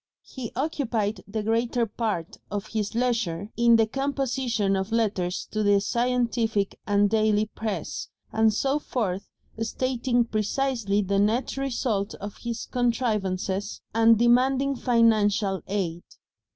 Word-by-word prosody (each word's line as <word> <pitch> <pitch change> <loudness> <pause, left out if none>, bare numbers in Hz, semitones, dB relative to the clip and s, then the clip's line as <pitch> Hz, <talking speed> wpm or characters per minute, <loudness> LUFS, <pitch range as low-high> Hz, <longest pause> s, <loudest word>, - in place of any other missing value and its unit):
He 250 -4 -7
occupied 235 -7 -1
the 210 +1 -3
greater 230 +2 +1
part 210 -6 -3
of 205 +1 -3
his 215 0 -3
leisure 225 -6 -1
in 235 0 +5
the 225 -1 +5
composition 260 -5 -1
of 190 +3 -2
letters 200 -6 0
to 215 - -1
the 205 -1 +4
scientific 235 -2 0
and 205 0 +4
daily 215 0 +2
press, 215 -5 -4 0.3
and 220 0 +4
so 270 +7 0
forth, 205 -10 -3 0.3
stating 245 +1 0
precisely 215 -1 0
the 195 +1 +1
net 220 +6 +1
result 245 -7 -1
of 205 0 -8
his 235 -1 -4
contrivances, 210 -5 -1
and 225 0 +5
demanding 260 +4 +3
financial 215 -6 +2
aid. 180 -4 -2
225 Hz, 125 wpm, -26 LUFS, 205-245 Hz, 0.3 s, in